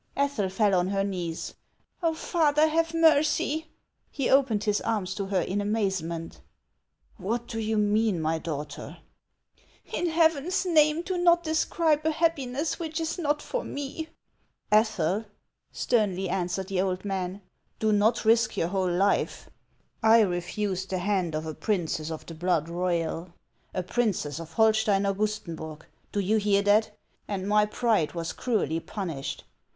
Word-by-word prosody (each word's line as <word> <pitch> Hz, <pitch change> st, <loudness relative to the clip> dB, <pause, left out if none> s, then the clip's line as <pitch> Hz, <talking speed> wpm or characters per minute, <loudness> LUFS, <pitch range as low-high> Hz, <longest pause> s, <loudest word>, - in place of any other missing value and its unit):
Ethel 275 Hz, -9 st, 0 dB
fell 200 Hz, +1 st, +2 dB
on 180 Hz, 0 st, +2 dB
her 195 Hz, 0 st, 0 dB
knees. 180 Hz, -4 st, -4 dB, 0.2 s
" -, -, -44 dB
Oh, 330 Hz, -2 st, +1 dB
father, 310 Hz, -2 st, +2 dB
have 325 Hz, +1 st, +1 dB
mercy! 315 Hz, -1 st, +3 dB, 0.2 s
" -, -, -47 dB
He 275 Hz, -, -1 dB
opened 255 Hz, -6 st, +3 dB
his 210 Hz, -1 st, +1 dB
arms 195 Hz, -5 st, -1 dB
to 200 Hz, 0 st, -4 dB
her 190 Hz, -2 st, +1 dB
in 195 Hz, +4 st, -1 dB
amazement. 190 Hz, -6 st, -2 dB, 0.4 s
" -, -, -54 dB, 0.3 s
What 225 Hz, +4 st, -2 dB
do 230 Hz, -1 st, -5 dB
you 220 Hz, 0 st, 0 dB
mean, 210 Hz, -2 st, +2 dB
my 160 Hz, +1 st, 0 dB
daughter? 150 Hz, -2 st, -6 dB, 0.3 s
" -, -, -50 dB
" -, -, -24 dB
In 350 Hz, -, 0 dB
Heaven's 325 Hz, +2 st, +2 dB
name, 310 Hz, -1 st, +4 dB
do 365 Hz, 0 st, -2 dB
not 345 Hz, -1 st, +4 dB
describe 315 Hz, -1 st, +1 dB
a 315 Hz, -, +2 dB
happiness 305 Hz, -2 st, 0 dB
which 320 Hz, -1 st, -3 dB
is 330 Hz, +2 st, -2 dB
not 295 Hz, -2 st, 0 dB
for -, -, -3 dB
me! 285 Hz, +3 st, -5 dB, 0.3 s
" -, -, -41 dB, 0.3 s
"Ethel," 215 Hz, -2 st, +2 dB, 0.5 s
sternly 195 Hz, -5 st, 0 dB
answered 185 Hz, +1 st, -2 dB
the 190 Hz, -2 st, +1 dB
old 185 Hz, 0 st, -2 dB
man, 190 Hz, 0 st, -3 dB, 0.3 s
"do 220 Hz, -1 st, +1 dB
not 220 Hz, +3 st, +2 dB
risk 230 Hz, +1 st, +3 dB
your 165 Hz, -, +1 dB
whole 185 Hz, -1 st, 0 dB
life. 195 Hz, +3 st, 0 dB, 0.5 s
I 225 Hz, 0 st, +6 dB
refused 190 Hz, 0 st, -1 dB
the 190 Hz, -, -1 dB
hand 180 Hz, -3 st, 0 dB
of 155 Hz, +1 st, -3 dB
a 160 Hz, -, -4 dB
princess 165 Hz, -5 st, -1 dB
of 160 Hz, -1 st, -6 dB
the 165 Hz, -, -8 dB
blood 165 Hz, -1 st, 0 dB
royal, 170 Hz, -1 st, -2 dB, 0.4 s
a 185 Hz, -, -2 dB
princess 180 Hz, -, -1 dB
of 165 Hz, -1 st, -9 dB
Holstein 215 Hz, -1 st, +3 dB
Augustenburg, 190 Hz, -6 st, -3 dB
— -, -, -40 dB
do 205 Hz, -, -1 dB
you 205 Hz, +3 st, +2 dB
hear 200 Hz, -1 st, +2 dB
that? 210 Hz, +1 st, +3 dB, 0.2 s
— -, -, -42 dB
and 195 Hz, -2 st, -3 dB
my 210 Hz, 0 st, +4 dB
pride 210 Hz, -7 st, +1 dB
was 165 Hz, -1 st, -4 dB
cruelly 210 Hz, -9 st, 0 dB
punished. 165 Hz, -7 st, -5 dB
205 Hz, 165 wpm, -27 LUFS, 180-270 Hz, 0.5 s, I